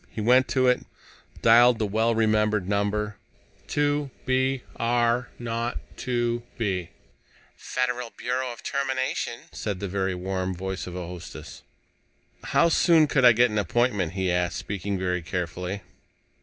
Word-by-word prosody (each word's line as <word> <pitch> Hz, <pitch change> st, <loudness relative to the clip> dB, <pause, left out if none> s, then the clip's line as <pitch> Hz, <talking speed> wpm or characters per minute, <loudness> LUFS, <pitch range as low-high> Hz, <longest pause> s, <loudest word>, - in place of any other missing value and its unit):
He -, -, -8 dB
went 125 Hz, +4 st, +4 dB
to 130 Hz, -1 st, +2 dB
it, 125 Hz, 0 st, +3 dB, 0.6 s
dialed 120 Hz, +1 st, +7 dB
the 110 Hz, -, 0 dB
well 110 Hz, +3 st, +1 dB
remembered 105 Hz, -3 st, +2 dB
number: 105 Hz, +1 st, -1 dB, 0.5 s
"2 145 Hz, -1 st, 0 dB, 0.2 s
B 130 Hz, 0 st, +1 dB
R 120 Hz, +1 st, +1 dB
0 115 Hz, 0 st, -2 dB, 0.2 s
2 120 Hz, -1 st, -1 dB, 0.2 s
B." 95 Hz, -6 st, -1 dB, 0.7 s
"Federal 125 Hz, -1 st, -2 dB
Bureau 125 Hz, +1 st, -2 dB
of 120 Hz, -, -11 dB
Termination," 130 Hz, -3 st, -2 dB
said 100 Hz, -4 st, -4 dB
the 100 Hz, -, -3 dB
very 95 Hz, 0 st, -1 dB
warm 95 Hz, 0 st, -2 dB
voice 95 Hz, +1 st, -4 dB
of 90 Hz, -, -7 dB
a 90 Hz, -1 st, -4 dB
hostess. 85 Hz, -3 st, -9 dB, 0.8 s
"How 170 Hz, -, +4 dB
soon 165 Hz, -1 st, +5 dB
could 140 Hz, -2 st, +1 dB
I 120 Hz, -, +9 dB
get 120 Hz, +1 st, +4 dB
an 105 Hz, -, 0 dB
appointment?" 105 Hz, -3 st, +1 dB
he 95 Hz, -2 st, 0 dB
asked, 90 Hz, 0 st, 0 dB
speaking 100 Hz, 0 st, -3 dB
very 90 Hz, -1 st, -1 dB
carefully. 90 Hz, +3 st, -4 dB
110 Hz, 140 wpm, -26 LUFS, 95-125 Hz, 0.8 s, I